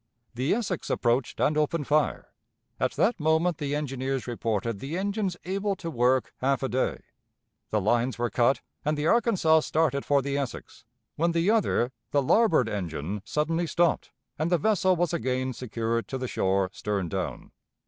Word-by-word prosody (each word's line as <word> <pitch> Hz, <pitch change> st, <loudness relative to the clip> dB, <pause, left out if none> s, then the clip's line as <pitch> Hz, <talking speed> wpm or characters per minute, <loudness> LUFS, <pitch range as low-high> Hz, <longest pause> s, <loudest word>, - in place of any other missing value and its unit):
The 130 Hz, +9 st, +1 dB
Essex 200 Hz, -7 st, -3 dB
approached 120 Hz, +1 st, 0 dB
and 150 Hz, -, +2 dB
opened 150 Hz, 0 st, 0 dB
fire; 150 Hz, +1 st, 0 dB, 0.5 s
at -, -, 0 dB
that 220 Hz, +1 st, +1 dB
moment 160 Hz, +2 st, +2 dB
the 145 Hz, 0 st, -1 dB
engineers 135 Hz, -2 st, -2 dB
reported 115 Hz, -3 st, -2 dB
the 145 Hz, -, -4 dB
engines 200 Hz, -2 st, -1 dB
able 195 Hz, +2 st, -1 dB
to 170 Hz, -3 st, -6 dB
work 125 Hz, -2 st, +2 dB
half 135 Hz, 0 st, 0 dB
a 135 Hz, -, 0 dB
day. 130 Hz, +2 st, -1 dB, 0.7 s
The 110 Hz, -, +1 dB
lines 120 Hz, +4 st, +1 dB
were 120 Hz, -2 st, -1 dB
cut, 120 Hz, +3 st, +2 dB, 0.2 s
and 150 Hz, 0 st, 0 dB
the 150 Hz, -, -1 dB
Arkansas 190 Hz, -6 st, +4 dB
started 155 Hz, -3 st, 0 dB
for 140 Hz, -2 st, +2 dB
the 140 Hz, +1 st, -1 dB
Essex, 130 Hz, -4 st, -6 dB, 0.3 s
when 170 Hz, +2 st, +1 dB
the 170 Hz, +5 st, +2 dB
other 190 Hz, -, +2 dB, 0.2 s
the 140 Hz, +2 st, +2 dB
larboard 165 Hz, -, +4 dB
engine 95 Hz, -1 st, -4 dB
suddenly 165 Hz, +5 st, 0 dB
stopped, 170 Hz, +1 st, +1 dB, 0.3 s
and 160 Hz, +3 st, 0 dB
the 175 Hz, -, +5 dB
vessel 185 Hz, +1 st, +2 dB
was 175 Hz, 0 st, 0 dB
again 130 Hz, -5 st, -1 dB
secured 115 Hz, -1 st, -2 dB
to 135 Hz, -, -4 dB
the 130 Hz, -1 st, -3 dB
shore 95 Hz, -3 st, 0 dB
stern 100 Hz, -4 st, -2 dB
down. -, -, -4 dB
140 Hz, 170 wpm, -27 LUFS, 120-170 Hz, 0.7 s, the